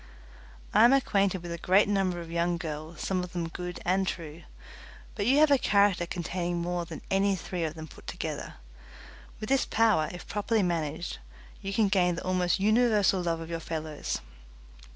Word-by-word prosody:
I 215 - +6
am 240 +3 +7
acquainted 195 -8 +2
with 170 - -6
a 170 - -4
great 190 +5 +4
number 195 -3 0
of 165 -1 -9
young 170 +1 0
girls, 155 0 -6
some 185 -2 -1
of 180 - -8
them 170 -2 -2
good 180 +1 -6
and 190 +2 +2
true, 165 -2 -5 0.7
but 205 0 -2
you 270 +3 +5
have 305 0 +5
a 280 - +5
character 200 -5 +3
containing 175 0 -3
more 175 0 -2
than 165 -2 -9
any 195 0 +3
three 180 -1 -4
of 155 0 -4
them 160 -1 -8
put - - -15
together. - - -5 0.8
With 215 - -5
this 270 0 +2
power, 215 -9 +3
if 175 - -9
properly 210 +1 0
managed, 165 -1 -2 0.4
you 195 - -4
can 210 +1 +3
gain 180 -3 +2
the - - -6
almost 185 0 +1
universal 210 -2 +3
love 165 -1 -1
of 165 +1 -7
your 165 - -2
fellows. 155 - -4
180 Hz, 185 wpm, -28 LUFS, 170-200 Hz, 0.8 s, am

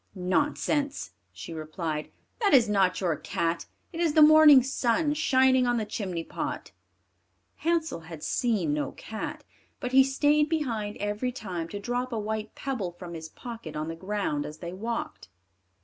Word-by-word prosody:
"Nonsense," 280 +9 0 0.2
she 165 - -8
replied; 155 -1 -4 0.3
"that 410 - +4
is 240 -4 +6
not 195 -3 +2
your 175 -5 +1
cat; 165 +2 -2 0.3
it 330 - -5
is 335 -3 +2
the 310 - +8
morning 300 -3 +8
sun 270 +3 +1
shining 260 -4 +3
on 240 0 +2
the 220 - -1
chimney 185 -6 -4
pot." - - -5 0.9
Hansel 325 - 0
had 160 -2 -10
seen 210 - 0
no 150 -1 -2
cat, 220 -1 -6 0.4
but 250 - -4
he 265 +1 +7
stayed 295 +3 +2
behind 230 -10 -2
every 205 +5 -2
time 185 -9 -5
to 205 - -6
drop 245 +4 -2
a 230 - -2
white 215 0 -4
pebble 220 -11 -3
from 175 0 -9
his 160 -1 -7
pocket 235 +3 -8
on 155 +1 -3
the 165 - -4
ground 185 -5 -2
as 150 +1 -8
they 170 +1 -7
walked. 230 +5 -4
220 Hz, 165 wpm, -27 LUFS, 175-265 Hz, 0.9 s, the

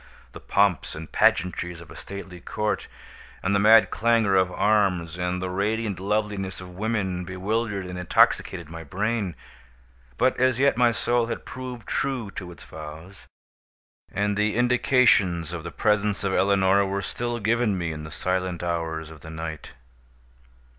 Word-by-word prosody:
The - - -10
pomps 100 -3 +1
and 80 -1 -8
pageantries 90 -1 +1
of 85 - -13
a - - -11
stately 95 -2 -8
court, 105 -1 -2 0.6
and 95 - +1
the 100 - +3
mad 110 +2 +6
clangor 115 -3 +2
of 95 -1 +3
arms, 95 -6 +1
and 90 +1 -1
the 90 - -2
radiant 105 0 -1
loveliness 100 -1 -2
of 90 -1 -9
women, 95 -3 -1
bewildered 100 +2 -2
and 90 0 -6
intoxicated 85 -1 +2
my 80 +1 -8
brain. 100 +2 -2 0.8
But 130 0 +2
as 130 -1 +3
yet 140 -1 +3
my 120 0 +4
soul 120 +2 +1
had - - -5
proved 125 -3 -7
true 130 -7 -2
to 90 -3 -7
its 85 - -12
vows, 80 +5 -10 0.8
and 105 0 0
the 105 +1 +1
indications 120 - +3
of 85 -2 -5
the 85 - -5
presence 105 +2 +1
of 95 -1 0
Eleonora 100 0 +3
were 100 +1 -2
still 120 0 -3
given 110 -1 +1
me 85 -2 -2
in 75 -1 -6
the 75 - -7
silent 90 +1 -2
hours 80 -2 -3
of 80 -3 -13
the 80 - -10
night. 80 -1 -6
100 Hz, 160 wpm, -25 LUFS, 90-110 Hz, 0.8 s, mad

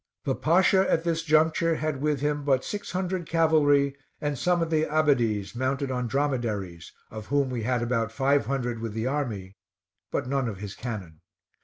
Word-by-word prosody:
The 135 - 0
Pasha 185 +6 +3
at 165 - +2
this 165 -1 0
juncture 160 +1 +3
had 155 -3 -2
with 150 -2 0
him 145 0 0
but 135 -2 +1
six 205 -4 -5
hundred 185 -1 -2
cavalry 145 -4 +3 0.2
and 145 -1 -1
some 175 +5 +1
of 165 - -4
the 155 -1 +3
Abbadies 125 -11 +1
mounted 130 +2 -1
on 125 -1 -1
dromedaries, 115 -11 -2 0.2
of 110 -1 -8
whom 140 -2 +1
we 120 -2 -2
had 120 +1 0
about 115 -2 0
five 140 +3 +1
hundred 125 -4 -2
with 115 -2 -4
the 110 +1 -2
army, 115 -9 -3 0.5
but - - -2
none 135 -2 0
of 100 - -6
his 100 0 -7
cannon. 100 -11 -7
140 Hz, 180 wpm, -26 LUFS, 115-155 Hz, 0.5 s, Pasha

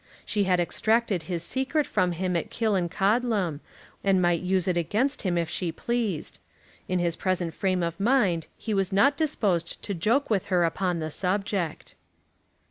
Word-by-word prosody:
She 205 -2 0
had 180 -1 +2
extracted 215 +2 +1
his 170 -2 -2
secret 265 - 0
from 180 -1 +1
him 180 +1 -1
at 170 - -1
Killancodlem, 200 -3 +1 0.4
and 195 -2 +3
might 175 -2 +2
use 185 0 +1
it 180 - +1
against 215 - 0
him 180 -3 0
if 170 -1 0
she 175 0 -2
pleased. 225 -6 -2 0.5
In 185 - 0
his 170 -2 0
present 180 -3 -1
frame 185 -1 0
of 170 +2 -3
mind 200 -8 +2
he 220 - -3
was 195 -2 0
not 275 +9 +4
disposed 200 - 0
to 200 - -2
joke 230 - +1
with 205 -4 0
her 180 -3 +2
upon 175 +1 0
the 155 -1 -4
subject. 190 -2 -2
185 Hz, 165 wpm, -26 LUFS, 175-215 Hz, 0.5 s, not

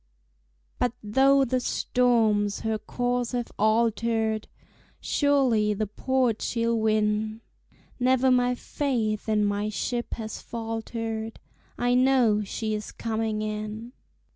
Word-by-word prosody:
But 245 -2 +1
though 270 +6 +4
the 255 +1 0
storms 225 -5 +1
her 220 -1 -1
course 245 +2 -2
have 245 -1 -2
altered, 220 0 +1 0.5
Surely 255 -8 +2
the 215 +2 -1
port 245 +2 0
she'll 230 0 0
win; 215 0 0 0.6
Never 260 +1 +3
my 250 0 +3
faith 230 -7 -2
in 210 -1 +2
my 205 +1 -1
ship 240 +4 -3
has 220 -1 -6
faltered, 225 -1 -5 0.4
I 245 0 +1
know 250 -5 +4
she 215 +2 -3
is 210 0 -4
coming 220 -1 -2
in. 215 +2 -5
225 Hz, 115 wpm, -26 LUFS, 215-245 Hz, 0.6 s, though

